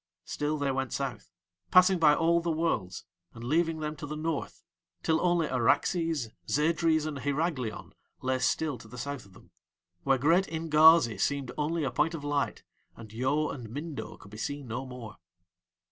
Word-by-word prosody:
Still 150 +1 -2
they 140 -1 0
went 135 -1 -2
South, 135 -3 -4 0.4
passing 185 0 +6
by 150 -2 +6
all 170 +1 +3
the 170 - -2
Worlds 155 - -1 0.3
and 115 - -9
leaving 160 +4 +1
them 150 0 -3
to 150 - -6
the 150 - -5
North, 160 -1 -3 0.4
till 160 0 +2
only 175 -2 +2
Araxes, 135 - +1 0.2
Zadres, 160 +1 +2
and 150 -3 -4
Hyraglion 145 -4 -2 0.3
lay 130 0 -1
still 135 +2 0
to - - -13
the 125 +3 -11
South 140 -3 -5
of 95 - -20
them, 95 - -18 0.5
where 135 +8 +2
great 165 +8 +3
Ingazi 160 - +5
seemed 140 +2 -1
only 155 +2 -1
a 135 - -1
point 150 +6 +1
of 150 - -7
light, 145 -1 -1 0.3
and 110 -2 -12
Yo 135 +6 0
and 120 -5 -7
Mindo 145 +4 -6
could 100 - -15
be 105 - -9
seen 145 +2 -4
no 125 +4 -4
more. 120 -4 -9
145 Hz, 175 wpm, -29 LUFS, 130-160 Hz, 0.5 s, passing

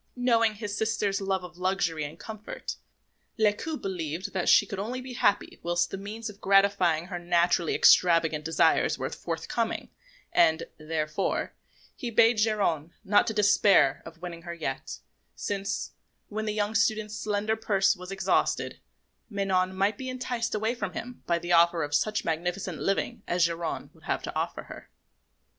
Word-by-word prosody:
Knowing 230 -3 +2
his 205 -1 -5
sister's 215 -3 0
love 190 -1 -1
of 175 -1 -11
luxury 180 -4 0
and 150 +2 -6
comfort, 215 +2 -7 0.6
Lescaut 220 +9 0
believed 180 0 -4
that 185 -2 0
she - - +7
could 195 -1 -6
only 235 +6 -3
be 255 0 -8
happy 205 - +1
whilst 175 0 0
the - - -3
means 215 +3 -6
of 210 -1 -10
gratifying 195 -4 +3
her 180 -1 -5
naturally 175 -1 +2
extravagant 165 -3 +5
desires 160 +1 +2
were - - -3
forthcoming; - - -3 0.4
and, 160 - +4 0.2
therefore, 155 +3 -2 0.4
he 245 - -4
bade 230 0 +4
Geronte 200 -8 +1
not 205 0 +3
to 220 - 0
despair 200 -8 +4
of 165 +1 -13
winning 170 -1 -6
her 170 0 -7
yet, 135 -5 -4 0.4
since, 200 - -3 0.4
when 215 +1 -3
the 215 - 0
young 210 0 -1
student's 215 -1 +1
slender 210 +1 -1
purse 200 -3 +2
was 180 0 -10
exhausted, 195 -1 0 0.5
Manon 190 -3 0
might 200 +2 +1
be 260 -1 -4
enticed 245 -2 -2
away 220 +2 0
from 200 -7 -4
him 250 +1 -7
by 170 - +2
the 175 +1 -5
offer 170 -1 +5
of 145 0 -5
such 215 +5 +1
magnificent 175 +2 -2
living 210 +3 -1
as 175 0 +3
Geronte 170 -1 -3
would - - -20
have - - -1
to - - -5
offer - - -2
her. - - -11
195 Hz, 160 wpm, -28 LUFS, 170-215 Hz, 0.6 s, she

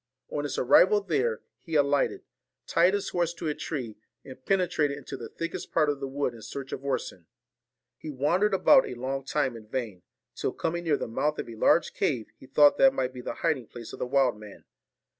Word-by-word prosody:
On 145 -1 -3
his 145 - -3
arrival 190 +11 +5
there, 135 - -1 0.2
he 165 +2 -6
alighted, 145 -1 +2 0.4
tied 180 +4 +3
his 200 - -2
horse 170 -1 -1
to 165 -1 -5
a 150 - 0
tree, 125 -9 -5 0.3
and 130 -1 -12
penetrated 160 -6 +1
into 145 - -8
the - - -8
thickest 165 - -6
part 155 -3 +3
of 145 - -6
the 135 - -4
wood 135 -2 -2
in 115 - -12
search 135 +4 -7
of 135 - -5
Orson. 130 -11 -3 0.7
He 155 - -7
wandered 175 +9 +1
about 265 +7 +5
a - - -6
long 135 +2 -3
time 135 -4 0
in 110 -2 -11
vain; 110 -7 -4 0.3
till - - -2
coming 170 +1 -3
near 150 -3 +2
the - - -4
mouth 150 +7 -1
of - - -4
a 115 - -8
large 160 +8 +3
cave, 120 -8 -1
he 130 - -14
thought 145 +2 +5
that 270 0 +6
might 130 0 -1
be 125 - -7
the - - -5
hiding 140 -8 0
place 115 -2 -10
of - - -9
the - - -2
wild 130 -4 +2
man. 105 -2 -13
140 Hz, 215 wpm, -27 LUFS, 125-165 Hz, 0.7 s, that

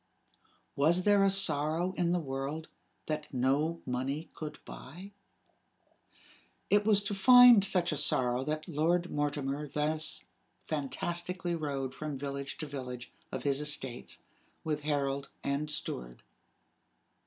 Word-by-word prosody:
Was 165 +6 +3
there 205 0 +4
a 195 - +4
sorrow 170 -1 +3
in 175 -1 0
the 175 - +2
world 140 +2 -5 0.4
that 155 -1 -4
no 140 +6 0
money 135 +5 -3
could 155 -1 -7
buy? 180 +9 -10 1.6
It 205 0 +4
was 205 -2 +5
to 205 - -2
find 245 +1 +8
such 180 -3 +2
a 150 - -2
sorrow 125 -3 +2
that 155 +1 -3
Lord 170 +2 0
Mortimer 145 0 -2
thus 150 +2 -2 0.4
fantastically 170 +5 -3
rode 140 -5 -3
from 150 -2 -5
village 140 0 -5
to 160 - -5
village 125 -4 -7 0.2
of - - -5
his 140 0 +1
estates, 135 -5 -2 0.4
with 150 -2 -2
herald 140 -2 -2
and 140 +2 -2
steward. - - -4
150 Hz, 125 wpm, -31 LUFS, 140-175 Hz, 1.6 s, find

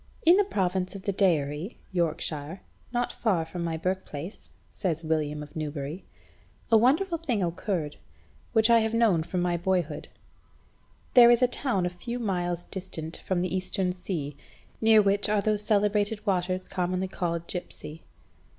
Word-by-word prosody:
"In 340 +2 +8
the 410 - +5
province 185 - -1
of 195 - -8
the 200 - -1
Deiri 165 - +1 0.2
(Yorkshire), 165 -1 -2 0.3
not 245 0 0
far 185 -8 0
from 170 +1 -5
my 165 -1 -2
birthplace," 180 0 -4 0.2
says 170 -4 -3
William 150 -2 -1
of 150 - -13
Newbury, 150 +2 -4 0.7
"a - - +7
wonderful 320 - +3
thing 245 - -1
occurred, 170 -3 -2 0.5
which 220 -1 +5
I 230 - +7
have 220 0 0
known 220 -8 +4
from 175 +2 -2
my 175 -1 +1
boyhood. 175 -3 -1 1.1
There 240 -2 +9
is 240 +1 +5
a - - +6
town 245 -7 -1
a - - +1
few 180 +7 -5
miles 175 -6 -1
distant 175 -5 -6
from 180 -2 -1
the 185 0 -1
Eastern 185 0 0
Sea, 170 -6 -4 0.5
near 220 -1 +6
which 200 +1 +2
are 210 0 +3
those 210 0 +1
celebrated 210 0 +1
waters 185 -2 0
commonly 185 +1 -1
called 170 -3 -2
Gipse.... 180 0 -5
185 Hz, 155 wpm, -27 LUFS, 170-210 Hz, 1.1 s, There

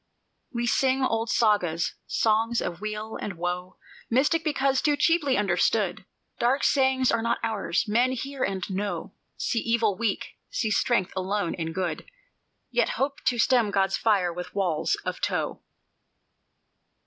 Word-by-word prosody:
"We 240 -2 -2
sing 265 +2 +2
old 225 -2 0
Sagas, 180 -7 +2
songs 225 +1 +2
of 175 +2 -4
weal 215 +1 -4
and 205 - -4
woe, 180 +2 -4 0.3
Mystic 290 +7 +2
because 275 -3 +1
too 295 -1 +2
cheaply 310 -6 +3
understood; 195 0 +1 0.3
Dark 255 +4 +2
sayings 265 -1 +3
are 230 - +1
not 235 +1 +1
ours; 220 -3 -1
men 240 +5 +2
hear 270 +1 -4
and 190 -2 -2
know, 200 +1 -3 0.2
See 230 - 0
Evil 230 -3 +1
weak, 220 0 -2 0.2
see 230 - -1
strength 200 -3 +1
alone 190 -1 -1
in 165 -2 -4
Good, 180 - -3 0.6
Yet - - +2
hope 275 +1 -1
to 250 -1 +2
stem 235 -2 +3
God's 195 -1 +1
fire 195 -6 +2
with 180 +2 -7
walls 175 -6 +1
of - - -4
tow. - - -1
220 Hz, 145 wpm, -26 LUFS, 190-255 Hz, 0.6 s, cheaply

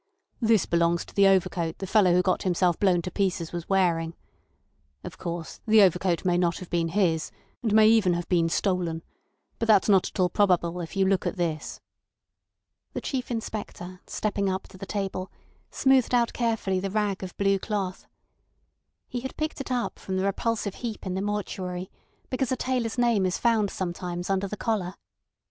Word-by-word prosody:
"This 225 -3 +3
belongs 170 0 +1
to - - -15
the 200 -1 +5
overcoat 175 -3 +1
the 195 - -5
fellow 195 -2 +4
who 180 +1 +4
got 185 0 +1
himself 180 -2 +1
blown 180 -4 +3
to 180 - -5
pieces 185 -4 -1
was 170 -1 -6
wearing. 170 -4 +1 0.9
Of - - -9
course, 170 -1 -5
the 215 -1 +7
overcoat 180 -1 +2
may 175 -1 +2
not 175 -1 +1
have 185 - -10
been 170 -1 +1
his, 165 -3 +1 0.3
and 225 - -1
may 215 0 +6
even 215 -6 +4
have 175 0 -4
been 170 -2 +2
stolen. 170 -3 -1 0.6
But 230 - -1
that's 210 -3 +5
not 195 -3 +4
at - - -10
all 180 -1 +3
probable 180 -3 +2
if 165 - -7
you 195 0 +3
look 190 0 +1
at - - -2
this." 160 -3 -3 1.1
The - - -3
Chief 260 -3 -3
Inspector, 205 -5 -5
stepping 200 -2 -1
up 190 0 -2
to - - -13
the 195 - -7
table, 195 -2 -3 0.4
smoothed 265 -2 +3
out 235 -1 +2
carefully 225 -5 0
the 195 +1 -3
rag 205 -1 -1
of 185 -2 -7
blue 195 -1 +2
cloth. 195 -3 -3 1.0
He 245 - -4
had 265 +2 -7
picked 310 -2 -3
it 275 - -7
up 245 -2 -2
from 190 -1 -3
the 185 - 0
repulsive 210 0 -1
heap 230 -4 -5
in 185 - -2
the 190 - -2
mortuary, 185 -3 -3 0.4
because 255 -1 -1
a - - +2
tailor's 250 -3 -1
name 235 -5 +3
is 185 -1 0
found 225 -4 +2
sometimes 175 0 -4
under 195 0 0
the 210 - -6
collar. 200 -5 -1
190 Hz, 185 wpm, -26 LUFS, 175-215 Hz, 1.1 s, the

